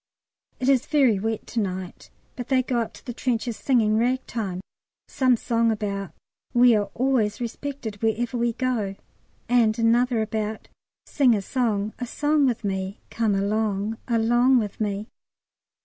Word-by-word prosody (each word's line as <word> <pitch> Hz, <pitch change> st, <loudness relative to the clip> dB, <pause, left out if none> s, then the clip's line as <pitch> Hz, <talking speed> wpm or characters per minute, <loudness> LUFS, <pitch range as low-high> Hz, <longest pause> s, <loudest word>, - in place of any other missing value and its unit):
It 255 Hz, -, -1 dB
is 270 Hz, -3 st, +3 dB
very 265 Hz, -9 st, +3 dB
wet 220 Hz, +1 st, -2 dB
to 235 Hz, -, -3 dB
night, 185 Hz, -3 st, -4 dB, 0.3 s
but 245 Hz, -, -6 dB
they 260 Hz, -2 st, +2 dB
go 245 Hz, -1 st, -1 dB
up 230 Hz, -, -2 dB
to -, -, -15 dB
the 245 Hz, -, -5 dB
trenches 235 Hz, -1 st, -1 dB
singing 220 Hz, -5 st, +2 dB
Ragtime, 230 Hz, -6 st, -1 dB, 0.5 s
some 255 Hz, -2 st, +2 dB
song 230 Hz, 0 st, +1 dB
about 200 Hz, -4 st, -3 dB, 0.4 s
"We 240 Hz, -1 st, +6 dB
are 205 Hz, -1 st, 0 dB
always 245 Hz, -5 st, +1 dB
respected 240 Hz, -3 st, -5 dB
wherever 230 Hz, +2 st, 0 dB
we 235 Hz, -1 st, +1 dB
go." 225 Hz, -6 st, -1 dB, 0.5 s
And 230 Hz, -3 st, +3 dB
another 235 Hz, 0 st, +2 dB
about 215 Hz, 0 st, -4 dB, 0.4 s
"Sing 255 Hz, -5 st, +3 dB
a 205 Hz, -, -1 dB
song 215 Hz, -3 st, -1 dB
a 245 Hz, -, -3 dB
song 295 Hz, +2 st, +2 dB
with 240 Hz, -3 st, -1 dB
me. 190 Hz, 0 st, -3 dB
Come 220 Hz, -3 st, +1 dB
along 210 Hz, +1 st, -1 dB
along 240 Hz, +2 st, +3 dB
with 210 Hz, -2 st, -2 dB
me." 205 Hz, 0 st, -2 dB
230 Hz, 150 wpm, -24 LUFS, 210-245 Hz, 0.5 s, We